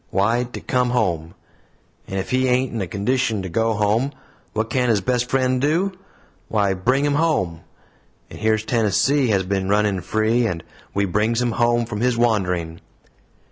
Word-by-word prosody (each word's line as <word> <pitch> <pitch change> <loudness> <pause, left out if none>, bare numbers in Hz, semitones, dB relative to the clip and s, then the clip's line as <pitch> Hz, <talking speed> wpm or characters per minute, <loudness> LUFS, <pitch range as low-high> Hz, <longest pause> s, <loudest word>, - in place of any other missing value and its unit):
Why, 115 +6 +1
to - - -5
come 125 -1 0
home. 85 -10 -1 0.7
And 95 - -4
if 95 - -3
he 130 +1 +2
ain't 125 0 +1
in 115 - -2
a 95 - -2
condition 110 +3 0
to 95 - -5
go 115 +4 +1
home, 110 +6 +1 0.4
what 110 0 -2
can 125 -2 +1
his 110 -3 +3
best 125 +5 -1
friend 130 -1 +1
do? 165 +7 +1 0.6
Why, 100 -3 +1
bring 130 +10 +1
him 145 - +1
home! 140 - 0 0.7
And - - -9
here's 110 0 +1
Tennessee 125 +5 +2
has 100 -4 +2
been 95 0 -2
running 105 -2 +2
free, 110 +6 +1
and 85 -5 -4 0.3
we 100 0 +2
brings 105 +5 0
him 120 -1 +1
home 120 +1 +2
from 105 -2 -5
his 125 -1 +1
wandering." 90 -8 0
110 Hz, 175 wpm, -21 LUFS, 100-125 Hz, 0.7 s, his